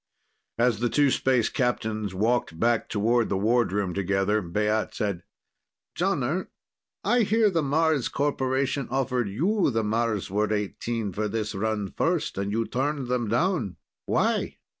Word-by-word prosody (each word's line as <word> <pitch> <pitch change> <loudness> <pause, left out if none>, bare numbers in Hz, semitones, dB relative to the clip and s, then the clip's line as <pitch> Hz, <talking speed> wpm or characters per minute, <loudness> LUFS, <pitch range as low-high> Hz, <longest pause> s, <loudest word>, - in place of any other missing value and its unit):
As 120 -2 +2
the 120 0 +1
two 145 0 +3
space 125 -4 +2
captains 110 -5 -1
walked 110 -5 0
back 115 +1 +1
toward 115 +2 +1
the 100 - 0
wardroom 105 -3 +1
together, 100 +2 +1
Baat 105 +4 -1
said: 100 -5 -2 0.7
"Jonner, 170 -2 0 0.6
I 245 - +3
hear 220 -1 +3
the 165 -3 +1
Mars 150 -1 +1
Corporation 135 -1 0
offered 125 -4 0
you 175 - +1
the 115 -3 0
Marsward 105 -2 0
XVIII 105 +1 -2
for 105 +4 -2
this 105 0 -3
run 105 -1 -2
first, 165 - -1
and 100 +1 -2
you 115 +2 0
turned 135 +1 -2
them 125 -2 0
down. 120 - 0 0.3
Why? - - 0
115 Hz, 140 wpm, -26 LUFS, 105-135 Hz, 0.7 s, two